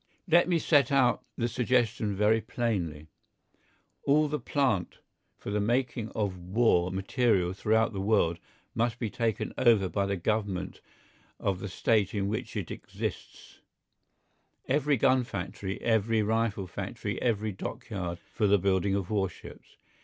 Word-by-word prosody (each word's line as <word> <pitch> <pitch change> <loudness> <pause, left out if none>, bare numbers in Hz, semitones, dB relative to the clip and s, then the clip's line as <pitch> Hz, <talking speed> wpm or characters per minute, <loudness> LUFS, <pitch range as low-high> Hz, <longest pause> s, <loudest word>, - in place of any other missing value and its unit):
Let 175 +1 +4
me 175 - +3
set 145 -5 +3
out 130 -3 +3
the 120 - 0
suggestion 120 -3 0
very 105 +3 +3
plainly. 95 -10 -2 1.0
All 150 +2 +3
the 150 0 -2
plant 120 - 0 0.4
for - - -6
the 105 - 0
making 120 0 0
of 100 -4 -1
war 90 -1 +2
material 95 -1 +1
throughout 110 +3 +1
the 95 - -3
world 95 -5 +2 0.3
must 115 0 0
be 115 -4 -3
taken 115 -2 -1
over 115 -6 +4
by 100 +1 0
the 100 - 0
Government 95 -1 -2 0.6
of 95 -2 -1
the 100 - -5
State 105 +1 +1
in 100 -1 0
which 110 - -4
it - - -4
exists; - - -7 1.1
every 145 +1 +2
gun 130 +1 +3
factory, 95 -2 -5
every 110 -1 +2
rifle 110 -2 0
factory, 85 - -5
every 110 -3 0
dockyard 95 -2 -5
for 105 +4 -2
the 100 +1 +5
building 95 0 +1
of 100 0 -3
warships. 95 -4 -4
110 Hz, 140 wpm, -29 LUFS, 95-120 Hz, 1.1 s, the